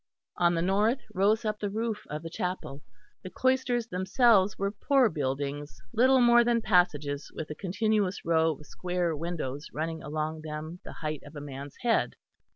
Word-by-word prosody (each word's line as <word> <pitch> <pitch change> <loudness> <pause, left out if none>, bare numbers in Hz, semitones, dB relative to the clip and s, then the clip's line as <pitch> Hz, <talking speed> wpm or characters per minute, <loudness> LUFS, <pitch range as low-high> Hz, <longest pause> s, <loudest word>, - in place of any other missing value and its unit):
On 175 0 +3
the 165 - 0
north 210 +8 +2
rose 210 +4 +2
up 210 0 -1
the 205 - -2
roof 220 +1 -3
of 150 +2 -5
the 165 - -5
chapel. 180 -6 -4 0.4
The 185 - -7
cloisters 255 0 +1
themselves 195 0 +3
were 200 0 -1
poor 260 +3 +3
buildings 145 -2 -3
little 260 +3 +5
more 240 -1 +6
than 235 0 +2
passages 150 -7 +1
with 155 -1 -5
a - - -4
continuous 200 +1 0
row 160 -1 +3
of 150 +1 -14
square 180 0 -2
windows 150 -3 -4
running 160 +1 -3
along 155 +1 -3
them 155 +2 -6
the - - -9
height 155 -2 -4
of 145 - -13
a - - -5
man's 140 -1 -8
head. 235 -2 +1
180 Hz, 170 wpm, -29 LUFS, 150-215 Hz, 0.4 s, more